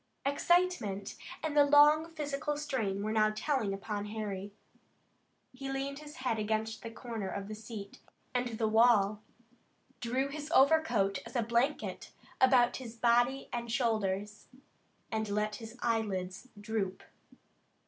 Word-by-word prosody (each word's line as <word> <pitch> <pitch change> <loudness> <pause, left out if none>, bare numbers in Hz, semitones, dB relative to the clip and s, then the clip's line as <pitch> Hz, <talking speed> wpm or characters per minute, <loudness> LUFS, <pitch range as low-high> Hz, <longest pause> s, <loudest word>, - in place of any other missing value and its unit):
Excitement 285 - +1 0.3
and 310 -2 -2
the 290 - +7
long 295 +3 +6
physical 295 -2 -3
strain 225 -10 -2
were 215 - -1
now 215 -1 +3
telling 255 -4 0
upon 205 +1 -4
Harry. 205 -2 -4 1.0
He 270 +1 -5
leaned 275 +1 -3
his 300 0 -11
head 250 -4 -1
against 220 +1 -1
the 230 - -6
corner 225 -3 -5
of 200 0 -5
the 215 - -6
seat 210 -2 -8 0.3
and 250 0 0
the 220 - +1
wall, 215 -2 +4 0.8
drew 255 +3 -1
his 295 +1 -6
overcoat 265 -9 +4
as - - -12
a 240 - +2
blanket 240 +6 -1 0.3
about 255 -2 +5
his 235 -3 -8
body 240 +3 +2
and 235 -1 -3
shoulders, 215 -4 -1 0.6
and 220 -1 -1
let 210 +1 -1
his 225 +1 -10
eyelids 195 -2 -1
droop. 205 -3 -3
230 Hz, 135 wpm, -32 LUFS, 210-270 Hz, 1.0 s, the